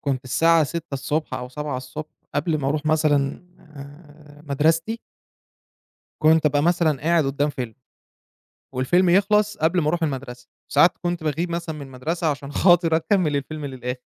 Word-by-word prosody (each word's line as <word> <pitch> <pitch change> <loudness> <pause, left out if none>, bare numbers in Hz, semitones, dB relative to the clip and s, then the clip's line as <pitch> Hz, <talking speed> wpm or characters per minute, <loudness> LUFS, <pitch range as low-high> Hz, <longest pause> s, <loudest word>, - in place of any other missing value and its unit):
كنت 135 -3 -2
الساعة 165 +5 +3
06:00 165 0 -5
الصبح 150 +3 -2
أو 125 0 -5
07:00 150 +1 -4
الصبح 130 +4 -7 0.2
قبل 155 +2 0
ما 135 -2 -1
أرُوح 150 +1 -2
مثلًا 150 -2 +1 0.2
آآ 150 0 -14
مدرستي 165 +10 +1 1.2
كنت 155 +1 +4
أبقى 145 -1 +2
مثلًا 165 -4 +2
قاعد 165 0 +2
قدام 140 +2 0
فيلم 125 -5 -6 1.0
والفيلم 175 +9 +2
يخلص 210 +2 +3
قبل 165 +3 +2
ما 150 - 0
أرُوح 170 +2 0
المدرسة، 130 -4 -4 0.2
ساعات 155 +5 +5
كنت 175 -2 -2
باغيب 160 +4 -1
مثلًا 170 -2 -3
من 150 - -8
المدرسة 155 +7 -3
عشان 140 0 -6
خاطر 175 -3 +4
أكمل 165 -4 +1
الفيلم 150 +1 -4
للآخر. 125 -1 -5
150 Hz, 155 wpm, -23 LUFS, 140-165 Hz, 1.2 s, ساعات